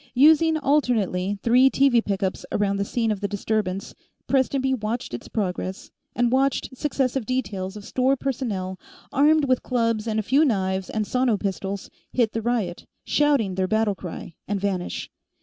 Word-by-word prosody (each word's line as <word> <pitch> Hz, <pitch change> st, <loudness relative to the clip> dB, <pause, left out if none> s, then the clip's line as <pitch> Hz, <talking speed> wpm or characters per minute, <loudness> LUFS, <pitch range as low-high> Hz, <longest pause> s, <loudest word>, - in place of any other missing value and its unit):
Using, 315 Hz, +4 st, +5 dB
alternately, 220 Hz, -, +1 dB
three 250 Hz, +3 st, +5 dB
TV 265 Hz, -4 st, +3 dB
pickups 195 Hz, -1 st, -2 dB
around 200 Hz, -1 st, +1 dB
the 200 Hz, -, -1 dB
scene 225 Hz, +1 st, 0 dB
of 205 Hz, -2 st, -3 dB
the 200 Hz, -, 0 dB
disturbance, 200 Hz, -2 st, -2 dB, 0.3 s
Prestonby 265 Hz, 0 st, +1 dB
watched 225 Hz, -, -3 dB
its 120 Hz, -, -6 dB
progress, 190 Hz, -2 st, -3 dB, 0.2 s
and 240 Hz, -1 st, +2 dB
watched 265 Hz, 0 st, +1 dB
successive 270 Hz, -2 st, -1 dB
details 205 Hz, -6 st, -2 dB
of 205 Hz, -, -10 dB
store 260 Hz, +1 st, +2 dB
personnel, 215 Hz, -9 st, -3 dB, 0.3 s
armed 300 Hz, +2 st, +4 dB
with 255 Hz, -2 st, +2 dB
clubs 230 Hz, -3 st, 0 dB
and 220 Hz, -1 st, 0 dB
a -, -, -1 dB
few 270 Hz, +8 st, +3 dB
knives 190 Hz, -7 st, 0 dB
and 215 Hz, -1 st, -1 dB
sono 250 Hz, -1 st, +1 dB
pistols, 195 Hz, 0 st, -4 dB, 0.2 s
hit 235 Hz, -4 st, +2 dB
the 225 Hz, -, -2 dB
riot, 220 Hz, -7 st, -2 dB, 0.2 s
shouting 285 Hz, -10 st, +2 dB
their 185 Hz, 0 st, 0 dB
battle 220 Hz, 0 st, +2 dB
cry, 180 Hz, -2 st, -8 dB
and 205 Hz, 0 st, -1 dB
vanish. 190 Hz, -2 st, -3 dB
225 Hz, 160 wpm, -24 LUFS, 195-260 Hz, 0.3 s, Using